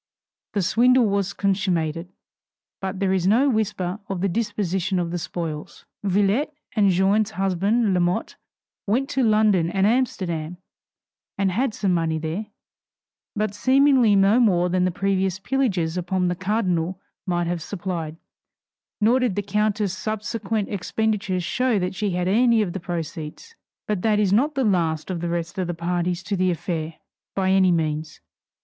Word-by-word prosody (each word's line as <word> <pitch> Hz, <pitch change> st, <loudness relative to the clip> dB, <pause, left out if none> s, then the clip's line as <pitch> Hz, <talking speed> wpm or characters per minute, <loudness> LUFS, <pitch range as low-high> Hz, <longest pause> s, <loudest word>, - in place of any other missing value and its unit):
The 200 Hz, -3 st, 0 dB
swindle 250 Hz, +5 st, +4 dB
was 200 Hz, -1 st, 0 dB
consummated, 180 Hz, -4 st, -1 dB, 0.7 s
but 190 Hz, 0 st, -4 dB
there 195 Hz, -1 st, +1 dB
is 185 Hz, -1 st, +1 dB
no 255 Hz, +7 st, +4 dB
whisper 200 Hz, -4 st, -1 dB
of 190 Hz, -2 st, -3 dB
the 195 Hz, -, +2 dB
disposition 190 Hz, -2 st, -1 dB
of 170 Hz, -1 st, -1 dB
the 175 Hz, -, -2 dB
spoils. 165 Hz, -3 st, -6 dB, 0.2 s
Villette, 205 Hz, +9 st, +1 dB, 0.2 s
and 205 Hz, -3 st, +4 dB
Jeanne's 195 Hz, +3 st, +2 dB
husband 195 Hz, +2 st, +1 dB
Lamotte, 175 Hz, 0 st, 0 dB, 0.5 s
went 255 Hz, +7 st, +1 dB
to 270 Hz, -, +1 dB
London 215 Hz, -7 st, +3 dB
and 195 Hz, +2 st, +1 dB
Amsterdam, 180 Hz, -9 st, -1 dB, 0.8 s
and 195 Hz, -1 st, +1 dB
had 230 Hz, +4 st, 0 dB
some 195 Hz, -3 st, 0 dB
money 165 Hz, -2 st, 0 dB
there; 165 Hz, +7 st, -4 dB, 0.9 s
but 210 Hz, -1 st, -1 dB
seemingly 260 Hz, -2 st, +4 dB
no 200 Hz, +4 st, +4 dB
more 180 Hz, -7 st, +3 dB
than 180 Hz, 0 st, +1 dB
the -, -, +2 dB
previous 190 Hz, 0 st, 0 dB
pillages 190 Hz, -7 st, -1 dB
upon 180 Hz, 0 st, 0 dB
the 180 Hz, -, -1 dB
cardinal 185 Hz, -2 st, -1 dB, 0.3 s
might 175 Hz, -1 st, 0 dB
have 170 Hz, 0 st, -2 dB
supplied; 170 Hz, -4 st, -4 dB, 0.8 s
nor 230 Hz, +4 st, +4 dB
did 245 Hz, -7 st, 0 dB
the 205 Hz, -, -1 dB
countess' 210 Hz, -1 st, 0 dB
subsequent 215 Hz, 0 st, -3 dB
expenditures 200 Hz, -1 st, -1 dB
show 250 Hz, +4 st, +1 dB
that 180 Hz, -1 st, -1 dB
she 205 Hz, +2 st, -1 dB
had 180 Hz, -1 st, -1 dB
any 230 Hz, +2 st, +4 dB
of 175 Hz, -4 st, -4 dB
the 190 Hz, -, -4 dB
proceeds. 170 Hz, -, -6 dB, 0.3 s
But 210 Hz, -4 st, -1 dB
that 215 Hz, 0 st, +2 dB
is 200 Hz, -2 st, +2 dB
not 285 Hz, +8 st, +2 dB
the 270 Hz, -, +1 dB
last 170 Hz, -4 st, 0 dB
of 170 Hz, -3 st, -3 dB
the 175 Hz, -, -2 dB
rest 170 Hz, +2 st, -3 dB
of 185 Hz, -, -1 dB
the 175 Hz, -, -3 dB
parties 175 Hz, +1 st, -2 dB
to 205 Hz, -, -2 dB
the 185 Hz, 0 st, +1 dB
affair, 165 Hz, -2 st, -3 dB, 0.4 s
by 190 Hz, -1 st, +1 dB
any 190 Hz, -1 st, +4 dB
means. 155 Hz, -2 st, -2 dB
190 Hz, 160 wpm, -23 LUFS, 175-215 Hz, 0.9 s, swindle